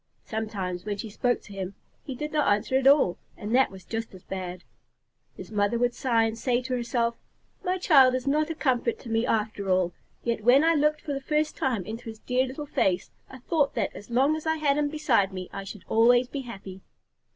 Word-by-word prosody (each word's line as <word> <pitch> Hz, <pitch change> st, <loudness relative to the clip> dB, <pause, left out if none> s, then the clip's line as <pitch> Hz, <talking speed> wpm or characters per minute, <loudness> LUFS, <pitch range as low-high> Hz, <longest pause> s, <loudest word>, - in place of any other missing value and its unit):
Sometimes, 195 Hz, -5 st, -4 dB
when 205 Hz, -1 st, -3 dB
she 215 Hz, +1 st, -6 dB
spoke 245 Hz, +3 st, 0 dB
to 205 Hz, -, -12 dB
him, 190 Hz, 0 st, -5 dB, 0.3 s
he 265 Hz, -, -6 dB
did 300 Hz, +4 st, -4 dB
not 300 Hz, -7 st, +2 dB
answer 210 Hz, +5 st, 0 dB
at 265 Hz, 0 st, +3 dB
all, 275 Hz, -11 st, +5 dB, 0.2 s
and 210 Hz, +2 st, -4 dB
that 260 Hz, +1 st, +5 dB
was 190 Hz, -1 st, -12 dB
just 225 Hz, -3 st, -5 dB
as 185 Hz, -, -14 dB
bad. 185 Hz, -1 st, -6 dB, 0.7 s
His -, -, -9 dB
mother 205 Hz, +2 st, +1 dB
would 245 Hz, 0 st, +1 dB
sigh 235 Hz, -3 st, +2 dB
and 225 Hz, 0 st, -1 dB
say 240 Hz, +1 st, +1 dB
to 255 Hz, -, -3 dB
herself, 235 Hz, -1 st, -1 dB, 0.4 s
"My 365 Hz, +1 st, 0 dB
child 270 Hz, -8 st, +6 dB
is 255 Hz, -, -3 dB
not 300 Hz, +3 st, +1 dB
a 325 Hz, -, -3 dB
comfort 250 Hz, -6 st, 0 dB
to 235 Hz, -, -9 dB
me 225 Hz, +1 st, +1 dB
after 210 Hz, -3 st, -1 dB
all, 185 Hz, -2 st, +2 dB, 0.3 s
yet 230 Hz, -2 st, -1 dB
when 255 Hz, +6 st, +6 dB
I 330 Hz, +1 st, +4 dB
looked 300 Hz, 0 st, +2 dB
for 290 Hz, -, -4 dB
the 275 Hz, -, -3 dB
first 300 Hz, +2 st, 0 dB
time 235 Hz, -9 st, -1 dB
into 225 Hz, +2 st, -7 dB
his 220 Hz, -, -8 dB
dear 255 Hz, +3 st, 0 dB
little 275 Hz, +4 st, -6 dB
face, 185 Hz, -9 st, 0 dB, 0.2 s
I 260 Hz, -, -10 dB
thought 280 Hz, +3 st, 0 dB
that -, -, -1 dB
as 205 Hz, -, -10 dB
long 270 Hz, +6 st, +3 dB
as 315 Hz, 0 st, -6 dB
I 320 Hz, -, +2 dB
had 295 Hz, -2 st, +1 dB
him 295 Hz, -1 st, +1 dB
beside 260 Hz, -10 st, +2 dB
me 185 Hz, -1 st, -6 dB
I 195 Hz, -, -5 dB
should 195 Hz, -1 st, -9 dB
always 245 Hz, +2 st, +4 dB
be 275 Hz, +2 st, -5 dB
happy." 195 Hz, -6 st, -9 dB
240 Hz, 225 wpm, -27 LUFS, 205-275 Hz, 0.7 s, child